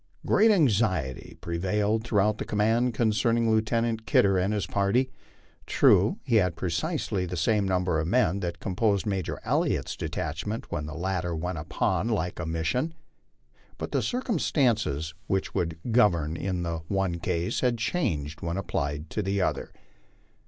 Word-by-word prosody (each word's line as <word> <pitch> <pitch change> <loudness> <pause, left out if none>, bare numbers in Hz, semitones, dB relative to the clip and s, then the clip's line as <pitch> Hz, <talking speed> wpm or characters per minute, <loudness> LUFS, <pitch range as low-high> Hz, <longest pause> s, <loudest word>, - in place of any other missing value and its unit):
Great 220 +2 +5
anxiety 105 - +1
prevailed 100 +6 0
throughout 105 -2 +1
the - - -1
command 115 +4 +1
concerning 115 0 +2
Lieutenant 110 0 0
Kidder 100 -1 +4
and 95 +2 +1
his 105 -2 -1
party. 105 +7 +1 0.6
True, - - +4
he 115 - +2
had 90 -5 +2
precisely 90 +2 -2
the 90 +1 -4
same 100 +4 +2
number 90 -3 +1
of 80 - -1
men 100 -3 +2
that 85 -2 -4
composed 100 +1 0
Major 95 -4 -2
Elliott's - - 0
detachment 95 +9 -4
when 75 0 -3
the 75 - -7
latter 90 -1 -2
went 85 +1 -3
upon 95 +6 -1
a 115 - +2
like 90 -3 -3
mission, 125 - -1 0.8
but - - -5
the - - +1
circumstances 120 - 0
which 95 -1 -1
would 80 -2 -1
govern 85 -9 +3
in 90 0 -2
the 85 -1 -2
one 95 -3 -1
case 85 0 -1
had 125 -2 +1
changed 80 - -2
when 85 +2 -2
applied 75 -4 -2
to 105 - -1
the 100 0 -1
other. - - -1
95 Hz, 150 wpm, -27 LUFS, 85-110 Hz, 0.8 s, Great